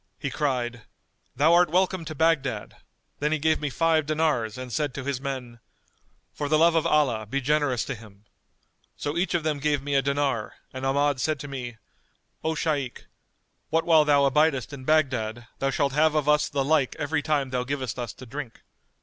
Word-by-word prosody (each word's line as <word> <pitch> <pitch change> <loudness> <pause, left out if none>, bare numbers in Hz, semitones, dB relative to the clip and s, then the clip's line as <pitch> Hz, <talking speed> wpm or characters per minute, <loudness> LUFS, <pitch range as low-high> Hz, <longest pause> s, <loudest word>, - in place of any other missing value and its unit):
He 140 -4 -4
cried, 125 -5 -1 0.5
'Thou 155 +4 +4
art 175 -1 +5
welcome 185 0 +1
to 155 0 -6
Baghdad'; 135 -9 0 0.4
then 150 +1 0
he 155 - +2
gave 155 +1 +2
me 150 - -1
five 160 +1 +1
dinars 150 -8 0
and 130 -2 -7
said 145 -1 -1
to 140 - -4
his 135 -1 -3
men, 130 -4 -5 0.7
'For 145 -1 -3
the 155 - +4
love 165 +2 +5
of 165 -1 +2
Allah 125 -8 +2
be 135 +6 -1
generous 140 -3 +1
to 135 - -3
him.' 105 -3 -14 0.7
So 145 +1 -3
each 175 +1 0
of 170 - 0
them 155 -2 -1
gave 145 -1 0
me 145 0 -3
a 135 - +4
dinar 140 -5 -1 0.2
and 130 +1 -3
Ahmad 140 -1 +1
said 155 0 0
to 145 - -6
me, 125 -4 -6 0.7
'O 160 0 0
Shaykh, 145 -5 -2 0.6
what 165 +1 +1
while 160 -2 +6
thou 145 -1 +4
abidest 140 -2 +2
in 130 -2 -8
Baghdad 120 -7 +1
thou 135 - +1
shalt 140 0 0
have 155 +1 +3
of 150 -1 +1
us 150 0 +3
the 140 -1 -1
like 145 -3 +2
every 145 +1 -1
time 145 -3 0
thou 125 -1 0
givest 130 -3 -3
us 120 -3 -3
to 130 - -12
drink. 130 -1 -8
140 Hz, 195 wpm, -26 LUFS, 130-155 Hz, 0.7 s, while